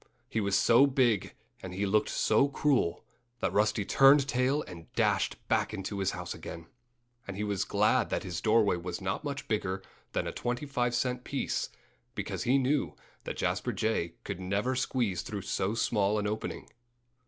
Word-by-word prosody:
He 110 - -1
was 100 -1 +2
so 120 +4 +6
big 125 -7 +1 0.3
and 90 -1 -7
he 100 +2 0
looked 105 +2 +2
so 110 +6 +3
cruel 140 - +1 0.3
that - - -1
Rusty 105 0 +2
turned 135 +3 +6
tail 130 +3 +1
and 85 -2 -11
dashed - - +2
back - - +1
into 100 0 -4
his 95 -1 +1
house - - -4
again. 85 0 -8 0.6
And 95 -1 -5
he 105 - -1
was 100 -2 -1
glad 105 +4 +2
that - - -1
his 90 -3 -4
doorway 110 -4 +3
was 85 0 -5
not 95 +7 -2
much 140 -2 -4
bigger 95 -3 -1 0.3
than - - 0
a - - -2
twenty 120 +4 -3
five 120 -3 0
cent 125 0 -1
piece, 140 - -2 0.5
because - - -3
he 130 +3 +4
knew 135 +2 +1 0.3
that - - -4
Jasper - - 0
Jay 95 -7 -1
could - - -5
never 100 +7 -1
squeeze 120 -8 0
through 100 -3 -5
so 95 +3 -1
small 105 -2 +1
an 105 - -1
opening. 105 +1 -3
110 Hz, 175 wpm, -30 LUFS, 95-125 Hz, 0.6 s, so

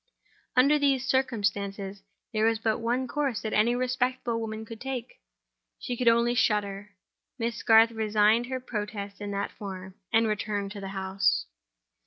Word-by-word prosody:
Under 280 +4 +5
these 275 -3 +2
circumstances, 205 -6 -1 0.3
there 215 0 +2
was 225 0 +3
but 220 +1 0
one 245 +3 0
course 275 -5 -1
that 220 - -3
any 230 +3 +3
respectable 250 -1 -1
woman 220 0 -5
could 225 0 -10
take—she 255 -1 -8
could 245 0 -2
only 235 +1 +4
shudder. 205 -3 0 0.4
Miss 230 -1 -2
Garth 225 0 +6
registered 220 +1 +2
her 260 0 -3
protest 210 -4 -5
in 205 - -4
that 200 0 -2
form, 190 -3 -8 0.2
and 225 0 +4
returned 210 -2 -2
to 205 -1 -7
the 195 - -5
house. 190 0 +1
225 Hz, 150 wpm, -28 LUFS, 205-245 Hz, 0.4 s, Garth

